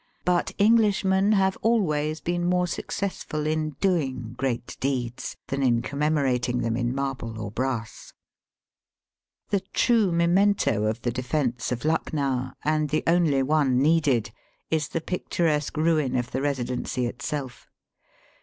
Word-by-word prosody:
But 180 0 +1
Englishmen 205 -2 +3
have 190 -2 +2
always 155 -9 +1
been 175 0 -1
more 180 0 +2
successful 175 -4 -3
in 155 -1 -1
doing 130 - 0
great 120 -2 -3
deeds 125 -3 -3
than 140 0 -1
in 120 -3 +2
commemorating 140 -4 0
them 115 -1 0
in 120 +1 -1
marble 135 -5 -3
or 105 -2 -5
brass. 120 -1 -4 1.4
The 200 - +3
true 220 0 +2
memento 170 - +2
of 110 +2 -2
the 120 - 0
defence 125 -1 -2
of 125 +3 -3
Lucknow, 140 -5 -1
and 155 -1 +1
the 155 +2 0
only 165 -5 +3
one 140 -3 +2
needed, 145 -5 +2 0.4
is 155 -2 +1
the 165 - -3
picturesque 160 -4 -1
ruin 155 -5 +2
of 125 0 -1
the - - -1
Eesidency 125 -2 -1
itself. 130 +1 -5
145 Hz, 130 wpm, -25 LUFS, 125-170 Hz, 1.4 s, Englishmen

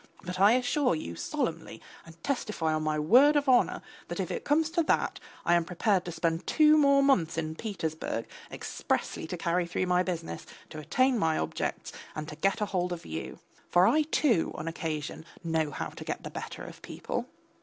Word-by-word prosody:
But 180 +1 -5
I 200 +3 +7
assure 250 - +2
you 85 - -5
solemnly - - -3 0.3
and 165 +1 -15
testify 215 - -1
on 155 - 0
my 155 0 0
word 250 - +6
of 290 -1 +2
honour 250 -2 +3 0.2
that - - -5
if - - -2
it 470 - -3
comes 315 +2 +2
to 340 0 +2
that, 320 - +1 0.3
I 175 - +4
am 170 -1 +4
prepared 185 +2 +1
to 175 - -4
spend 165 +1 -1
two 305 -1 +6
more 280 -2 +5
months 180 - +2
in 155 -1 -2
Petersburg 160 - -4 0.3
expressly - - -3
to 180 - -4
carry 170 +1 0
through 180 +1 -1
my 180 0 +3
business, 165 - -4 0.2
to 155 - -7
attain 255 - +2
my 160 -3 +2
objects, - - -3 0.2
and 155 0 -4
to 150 - -7
get 195 +6 +1
hold 185 -4 -1
of 175 -1 -5
you. 80 +1 -6 0.3
For 180 +1 +5
I, 310 - +4
too, 290 - +2
on 155 - -5
occasion 160 -2 -4 0.2
know 160 -2 0
how - - -4
to - - -9
get - - -4
the - - -6
better - - -7
of - - -10
people. - - -4
180 Hz, 195 wpm, -29 LUFS, 160-250 Hz, 0.3 s, I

